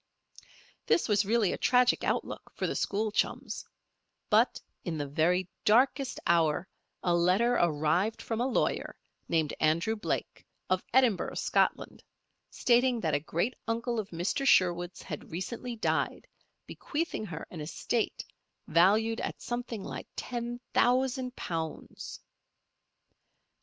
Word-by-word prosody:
This - - +3
was 210 -2 +3
really 220 -3 +2
a - - -5
tragic 250 0 +3
outlook - - -2
for - - -2
the - - -1
school 210 +2 0
chums; - - -2 0.6
but - - +4 0.2
in 170 -4 -3
the 145 - -2
very 170 +6 +1 0.2
darkest 255 +4 +3
hour 170 +1 +2 0.4
a 175 - +2
letter 185 +8 +3
arrived 175 +3 +1
from 225 0 -3
a 250 - +2
lawyer, 265 - 0 0.3
named 160 -3 +1
Andrew 170 +8 +2
Blake, 210 - -3 0.3
of 185 0 +2
Edinburgh, 245 -6 +3
Scotland, - - 0 0.5
stating 245 0 +3
that 160 -3 0
a - - +3
great 170 - -1
uncle 235 +1 -1
of 205 - -4
Mrs. 180 +11 -1
Sherwood's 175 -4 +3
had 150 - -7
recently 235 +8 -4
died, 220 - -1 0.4
bequeathing 310 -8 -3
her 160 -3 -6
an 165 - -6
estate 215 +9 -2 0.4
valued 215 +6 +3
at - - -4
something 240 -4 -4
like - - -6
ten 240 0 -4
thousand 255 0 +2
pounds. 160 -2 -5
210 Hz, 125 wpm, -30 LUFS, 170-240 Hz, 0.6 s, but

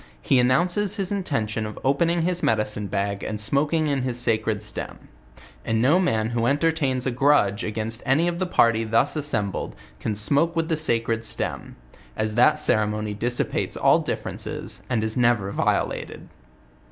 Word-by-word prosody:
he 130 - +2
announces 175 - +2
his 195 -3 -2
intention 115 - -2
of 110 0 -6
opening 165 +5 +1
his 180 0 -1
medicine 105 -1 0
bag 100 0 -2
and 105 -1 -4
smoking 145 +9 +1
in 140 -3 0
his 125 -1 -3
sacred 110 -3 0
stem; 105 - -6 0.5
and 115 -1 0
no 140 +10 +4
man 110 -12 0
who 120 0 0
en 140 +2 +2
tertains 145 -5 0
a 130 - 0
grudge 120 -5 +2
against 110 +2 -3
any 145 +6 +2
of 175 0 -2
the 185 - -1
party 115 -8 +3
thus 115 +6 +1
assembled, 115 -10 -2 0.2
can 110 - -2
smoke 145 +11 +2
with 165 -1 -1
the 160 - +2
sacred 115 -6 0
stem; 110 - -4 0.4
as 110 0 -1
that 120 +3 +4
ceremony 105 0 0
dissipates 120 +4 -1
all - - +4
differences, - - -4
and 115 -4 0
is 110 0 -1
never 120 -5 +2
violated. - - -2
120 Hz, 165 wpm, -24 LUFS, 110-150 Hz, 0.5 s, no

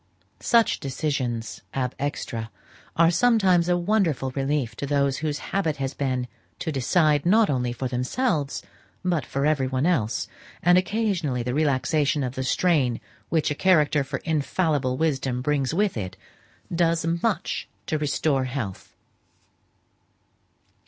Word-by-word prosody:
Such 230 -1 +3
decisions 130 -4 -3
ab 125 -2 -1
extra, 115 -5 -3 0.5
are 165 0 +5
sometimes 190 -5 +3
a 175 - +3
wonderful 175 -8 +1
relief 135 -3 -1
to 140 - -3
those 140 -1 +1
whose 150 -2 -2 0.2
habit 165 -6 +1
it - - -19
has 135 0 -3
been 130 -3 -1 0.3
to 160 - -3
decide, 150 +2 +2
not 210 +1 +4
only 125 -3 0
for 130 +2 -3
themselves, 140 - -1 0.4
but 175 -4 0
for 140 +1 -1
every 145 -4 +2
one 130 +2 0
else; 150 -12 0 0.4
and 175 +1 +6
occasionally 185 - 0
the 125 +1 -2
relaxation 145 0 +1
of 125 -1 -3
the 130 - -3
strain 130 -4 +2 0.3
which 160 -3 +1
a - - +2
character 150 -4 +3
for 140 +1 -4
infallible 150 -4 0
wisdom 135 -5 0
brings 140 -2 +1
with 200 +4 +1
it, 95 -5 -5 0.6
does 165 -1 +2 0.2
much 210 -7 -1 0.2
to 155 - -1
restore 145 -2 +1
health. 120 -7 -5
145 Hz, 140 wpm, -25 LUFS, 130-170 Hz, 0.6 s, and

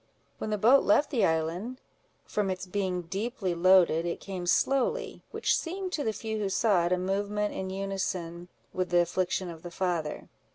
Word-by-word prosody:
When - - -3
the 210 - 0
boat 245 +7 +6
left 285 +9 +3
the 250 -6 +2
island, 170 +10 -1 0.5
from 205 -2 -1
its 185 0 -3
being 185 -1 -2
deeply 195 +2 -3
loaded, 170 -2 +5
it 170 0 -3
came 185 -3 -6
slowly, 275 - +1
which - - +1
seemed 370 +2 -3
to 300 - -1
the 220 - +1
few 220 0 -4
who 200 -2 -1
saw 195 -3 +2
it, - - -3
a 180 - +3
movement 205 +3 -1
in 190 0 -4
unison 185 -3 -3 0.3
with 185 -1 -1
the 175 0 +4
affliction 180 +1 -1
of 165 -2 -8
the 175 - -7
father. 170 -4 -2
190 Hz, 180 wpm, -29 LUFS, 175-215 Hz, 0.5 s, boat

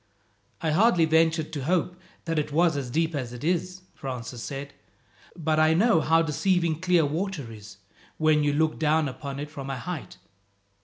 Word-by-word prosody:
"I 160 - 0
hardly 180 0 +4
ventured 160 0 +2
to 140 -4 -4
hope 180 +2 0 0.3
that 165 -2 0
it 150 0 -3
was 165 +1 +3
as 135 -3 -3
deep 160 +5 0
as 125 -5 -4
it 125 - -9
is," 180 +2 -1
Francis 125 -5 -6
said, 140 +2 -6 0.6
"but 155 -2 0
I 155 +1 +4
know 200 -2 +4
how 165 +2 +3
deceiving 170 0 +1
clear 180 -4 +3
water 155 -4 -3
is, 105 -2 -12 0.4
when 155 -1 +3
you 145 - +2
look 155 +2 0
down 155 0 +2
upon 140 +1 -6
it 145 +1 -6
from 140 -3 -7
a 135 - -3
height. 170 +5 -6
155 Hz, 175 wpm, -26 LUFS, 140-165 Hz, 0.6 s, hardly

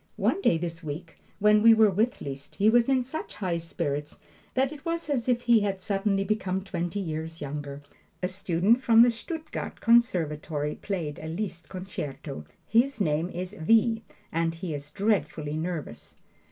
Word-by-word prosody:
One 395 - +1
day 170 - +4
this 165 0 -5
week, 160 +3 -7 0.2
when 210 +1 +5
we 225 +1 +8
were 220 -2 +5
with 220 +6 0
Liszt, 140 0 -7
he 210 +2 +4
was 240 +2 +4
in 260 -2 +3
such 265 +6 -6
high 180 -4 -1
spirits 150 -3 -3 0.4
that 265 +2 +2
it 285 -2 -12
was 335 -2 -2
as 255 -3 0
if 245 -1 +2
he 235 -2 +5
had 200 -2 -1
suddenly 195 +1 0
become 190 -3 -1
twenty 175 0 -3
years 160 -2 -4
younger. 145 0 -6 0.4
A - - +3
student 190 +5 +2
from 230 -2 +7
the 240 - +5
Stuttgart 315 +8 -6
conservatory 160 -10 +2
played 165 -7 -4
a 160 - -7
Liszt 175 0 -5
concerto. 150 - -6 0.2
His 245 +3 +2
name 160 -2 +1
is 180 +2 -5
V., 225 +5 +3 0.3
and 165 0 0
he 165 -1 -4
is 145 0 -6
dreadfully 155 -6 0
nervous. 165 -1 -5
185 Hz, 165 wpm, -27 LUFS, 160-225 Hz, 0.4 s, we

